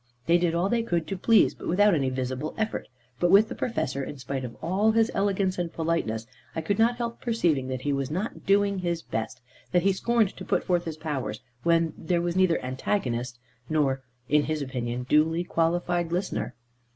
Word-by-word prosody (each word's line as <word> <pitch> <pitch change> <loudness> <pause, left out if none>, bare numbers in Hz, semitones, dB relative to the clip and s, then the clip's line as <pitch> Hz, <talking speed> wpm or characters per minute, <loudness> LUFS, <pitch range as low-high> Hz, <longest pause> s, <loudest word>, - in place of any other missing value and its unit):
They 170 +1 +4
did 170 -1 +1
all 175 +3 +2
they 235 +3 +1
could 175 -8 -1
to 195 - -1
please, 220 +4 +4
but - - -9
without 205 +4 +4
any 135 -5 +1
visible 130 +3 -3
effort. 220 0 -2 0.3
But 175 - +3
with 205 +4 +6
the - - -4
Professor, 140 - -2
in 145 - -6
spite 135 0 -4
of 120 -2 -7
all 195 +7 +2
his 225 0 +3
elegance 195 -2 0
and 170 -2 -2
politeness, 160 -10 -1 0.3
I 160 - -1
could 200 +6 -1
not 235 +2 +4
help 235 -1 -4
perceiving 170 - +1
that 130 -1 -3
he 145 +1 0
was 135 -1 -1
not 185 +8 -3
doing 200 0 +3
his 170 -2 -2
best, 110 +2 -4 0.3
that 175 -1 +3
he 195 0 +4
scorned 225 0 +1
to - - -7
put 185 - 0
forth 175 -1 +1
his 160 -2 -5
powers 150 -5 -3 0.2
when 165 -1 +2
there 170 +2 0
was 170 0 -1
neither 185 -3 +3
antagonist 125 - -2 0.3
nor 140 -4 +1 0.3
(in 150 +2 +3
his 155 -2 -1
opinion) 125 -2 -3
duly 160 +4 +3
qualified 175 0 0
listener. 180 +2 -2
170 Hz, 200 wpm, -27 LUFS, 140-195 Hz, 0.3 s, with